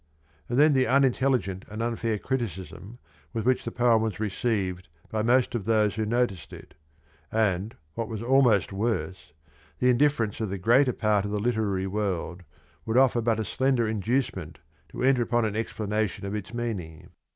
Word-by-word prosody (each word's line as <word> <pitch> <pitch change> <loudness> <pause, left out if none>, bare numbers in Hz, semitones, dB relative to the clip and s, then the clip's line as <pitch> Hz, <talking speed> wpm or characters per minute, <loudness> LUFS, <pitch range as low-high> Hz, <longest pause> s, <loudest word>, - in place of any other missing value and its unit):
"^ - - -39 0.5
And 120 - -1
then 150 +1 +6
the 130 -1 +3
unintelligent 130 -7 +2
and 110 +2 -4
unfair 115 -2 -1
criticism 105 - -5 0.4
with 115 - -3
which 130 0 +2
the - - -4
poem 120 -2 +3
was 110 -4 -2
received 100 -4 -2 0.2
by 110 - 0
most 120 +3 +2
of 115 -5 -3
those 105 -2 +2
who 110 +1 -2
noticed 115 -7 -1
it, - - -12 0.6
and, 105 -1 0 0.2
what 115 +5 -3
was 110 0 -5
almost 120 -7 +3
worse, 95 -6 -3 0.5
the 125 - +3
indifference 120 -5 +1
of 110 - -1
the 100 - -3
greater 125 +8 +4
part 105 -3 +1
of 100 - -3
the 105 - -1
literary 105 -4 0
world, 95 -3 -3 0.4
would 115 +2 -1
offer 130 -2 +4
but 115 -1 +1
a 110 - -1
slender 130 -2 +1
inducement 105 - -2 0.3
to - - -5
enter 130 -1 +4
upon 120 0 +1
an 105 -1 -2
explanation 110 -2 -2
of 100 - -4
its 105 -1 -5
meaning. 105 -10 -5
110 Hz, 175 wpm, -26 LUFS, 100-120 Hz, 0.6 s, then